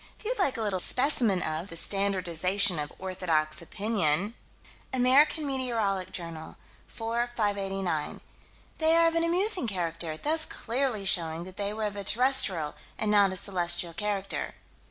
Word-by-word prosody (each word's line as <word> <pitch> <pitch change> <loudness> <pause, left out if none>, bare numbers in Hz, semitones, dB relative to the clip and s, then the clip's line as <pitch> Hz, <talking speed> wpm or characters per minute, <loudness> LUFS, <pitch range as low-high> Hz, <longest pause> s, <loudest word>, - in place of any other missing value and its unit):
If - - -17
you'd - - -2
like 285 -11 +1
a 225 - -2
little 200 -3 -1
specimen 240 -4 +2
of 160 +5 -2
the 165 - -3
standardization 190 -1 +2
of 145 0 -4
orthodox 170 -5 0
opinion 200 0 -1 0.6
Amer. 260 +4 +5
Met. 240 -10 -2
Jour., 165 -2 -7 0.3
4 230 +2 -2
589: 195 -7 -2 0.6
"They 320 0 +3
are 335 0 +5
of 330 - +2
an 330 0 +1
amusing 360 - +1
character, 165 -5 -3
thus 315 - 0
clearly 235 -4 -2
showing 170 -3 +1
that 185 +2 -11
they 200 0 -2
were 215 +1 -4
of 205 -1 -3
a 200 - -4
terrestrial 205 - +2 0.2
and 215 -1 -1
not 200 -2 +5
a - - -4
celestial 175 -3 +1
character." 200 +2 -3
200 Hz, 150 wpm, -28 LUFS, 175-245 Hz, 0.6 s, Amer